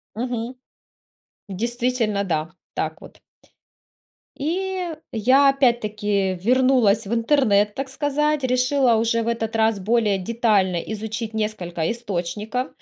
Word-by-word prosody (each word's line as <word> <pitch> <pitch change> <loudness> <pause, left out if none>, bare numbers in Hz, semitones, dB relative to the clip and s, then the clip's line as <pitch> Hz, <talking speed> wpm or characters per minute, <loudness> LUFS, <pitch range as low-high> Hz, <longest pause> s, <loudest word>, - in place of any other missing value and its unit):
Мгм. 240 +1 -3 0.9
Действительно, 235 0 -1
да, 160 -4 -2 0.2
так - - -3
вот - - -12
т - - -22 1.2
И 375 +6 -2 0.3
я 260 +5 +4
опять-таки 210 -7 +1
вернулась 240 -2 +3
в - - -4
интернет, 225 -5 +2
так 270 0 -4
сказать, 290 +1 0
решила 255 0 +2
уже 230 +1 +1
в - - -2
этот 225 -1 -2
раз 220 -2 +2
более 215 0 +2
детально 200 -3 +1
изучить 220 +4 -4
несколько 185 -7 -2
источников, 215 +3 -3
230 Hz, 110 wpm, -22 LUFS, 205-255 Hz, 1.2 s, я